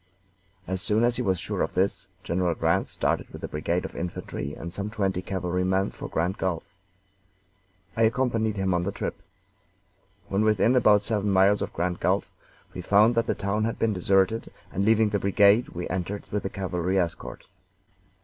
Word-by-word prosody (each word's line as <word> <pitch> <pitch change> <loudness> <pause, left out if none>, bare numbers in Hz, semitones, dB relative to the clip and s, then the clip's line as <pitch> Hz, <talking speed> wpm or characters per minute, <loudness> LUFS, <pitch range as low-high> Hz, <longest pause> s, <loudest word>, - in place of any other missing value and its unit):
As 95 0 -3
soon 105 +6 +1
as 120 0 +2
he - - -1
was 95 -2 +1
sure - - -3
of - - -2
this, 95 +2 0 0.2
General 85 -1 0
Grant - - +1
started - - -1
with - - -11
a - - -2
brigade 85 +4 -2
of - - -7
infantry 80 -4 -5
and 85 +1 -7
some 100 +2 -3
twenty 95 -4 -1
cavalrymen 95 +1 -1
for - - -7
Grand 85 +4 -1
Gulf. 90 -3 -1 1.3
I 115 - -1
accompanied 115 -2 +1
him 95 -1 +1
on 90 - +1
the 95 +3 -2
trip. 100 - -5 1.1
When 100 +2 +1
within 110 +3 +3
about 105 -5 +5
seven 105 -2 0
miles 100 +1 +4
of - - -3
Grand 90 +1 -2
Gulf - - 0 0.4
we 90 - -5
found 105 +6 +4
that 115 0 +1
the - - 0
town 100 +2 -1
had 115 - -2
been 115 -1 +1
deserted, 95 +4 +1 0.2
and 95 - -1
leaving 110 0 +4
the 100 0 0
brigade 100 +4 +4
we 90 +1 -5
entered 95 +2 -4
with 105 - -1
the 95 - -3
cavalry 90 -1 -2
escort. 85 -3 -3
95 Hz, 180 wpm, -26 LUFS, 90-105 Hz, 1.3 s, about